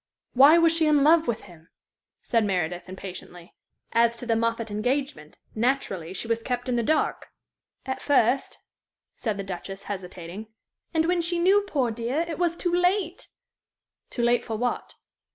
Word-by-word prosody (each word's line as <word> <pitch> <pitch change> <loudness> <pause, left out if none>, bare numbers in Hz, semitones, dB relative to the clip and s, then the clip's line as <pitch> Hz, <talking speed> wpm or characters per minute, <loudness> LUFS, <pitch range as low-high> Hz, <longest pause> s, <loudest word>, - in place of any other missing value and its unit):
"Why 280 +6 +7
was 330 -1 +4
she 325 -1 +2
in 295 -2 +4
love 320 +2 +5
with 235 -2 -1
him?" 170 -3 -16 0.5
said 230 -2 +1
Meredith, 180 -3 -2
impatiently. 180 -2 -9 0.4
"As 235 0 +3
to 245 - -8
the 230 -1 +1
Moffatt 230 -1 -1
engagement, 220 - -2 0.2
naturally, 215 -8 -1
she 190 +4 -5
was 230 0 0
kept 245 +1 -3
in 250 - 0
the 235 - +2
dark?" 305 +7 0 0.6
"At 265 0 -4
first," 265 -2 +2 0.6
said 215 -4 -3
the 200 - -3
Duchess, 195 +1 -7
hesitating. 185 +1 -7 0.4
"And 320 -1 +1
when 350 0 +1
she 340 +1 -1
knew, 380 +4 +4
poor 265 -10 0
dear, 240 +8 -2
it 330 -1 -5
was 345 -1 +1
too 350 -1 -1
late!" 360 0 +1 0.8
"Too 240 - -3
late 240 0 +3
for 225 - -4
what?" 245 +2 -3
240 Hz, 165 wpm, -26 LUFS, 205-310 Hz, 0.8 s, Why